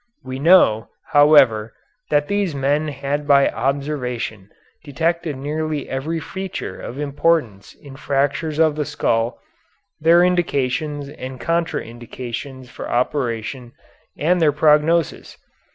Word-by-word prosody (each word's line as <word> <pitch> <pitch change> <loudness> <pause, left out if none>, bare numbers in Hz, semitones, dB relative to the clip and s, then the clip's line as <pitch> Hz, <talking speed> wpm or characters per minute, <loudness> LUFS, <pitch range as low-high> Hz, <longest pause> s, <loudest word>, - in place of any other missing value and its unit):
We 130 0 -6
know, 140 -9 +4 0.2
however, 135 -8 +5 0.3
that 145 0 +2
these 200 -6 -1
men 145 +3 0
had 145 +1 -3
by 140 -1 +5
observation 125 -6 -3 0.3
detected 160 0 -2
nearly 150 +1 -3
every 155 +5 -3
feature 190 - -6
of 125 - -7
importance 145 -7 -1
in 140 -2 -13
fractures 145 +2 -1
of 160 -2 +3
the 150 -1 -2
skull, 120 -5 -1 0.6
their 165 +3 +5
indications 145 -4 0
and 130 -2 -8
contra 165 +6 -1
indications 120 +3 -8
for - - -8
operation 120 -1 -2 0.4
and 175 +3 +1
their 155 -2 +4
prognosis. 150 +2 +2
145 Hz, 115 wpm, -20 LUFS, 130-155 Hz, 0.6 s, however